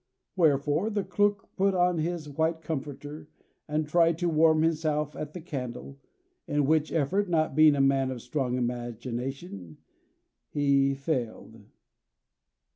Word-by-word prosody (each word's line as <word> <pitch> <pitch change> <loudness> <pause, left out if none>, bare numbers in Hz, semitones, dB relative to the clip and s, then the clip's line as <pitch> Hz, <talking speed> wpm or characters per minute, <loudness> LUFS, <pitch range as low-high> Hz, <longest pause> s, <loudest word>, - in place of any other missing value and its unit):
Wherefore 150 +2 +2
the 205 -2 -1
clerk 200 +2 0
put 195 0 +2
on 180 -1 +2
his 165 -1 -2
white 160 +3 -1
comforter, 145 0 -6 0.4
and 155 0 -1
tried 165 +1 +3
to 175 0 0
warm 160 0 +4
himself 155 -2 0
at 150 0 -6
the 180 - -7
candle; 135 -3 -6 0.5
in 145 -1 +1
which 155 +1 +2
effort, 180 +6 0
not 155 -4 +1
being 155 0 +6
a 140 - +2
man 135 -1 +2
of 125 -3 -6
strong 125 -1 -2
imagination, 120 - -5 0.7
he 140 -1 +2
failed. 120 -6 -4
150 Hz, 130 wpm, -28 LUFS, 135-165 Hz, 0.7 s, being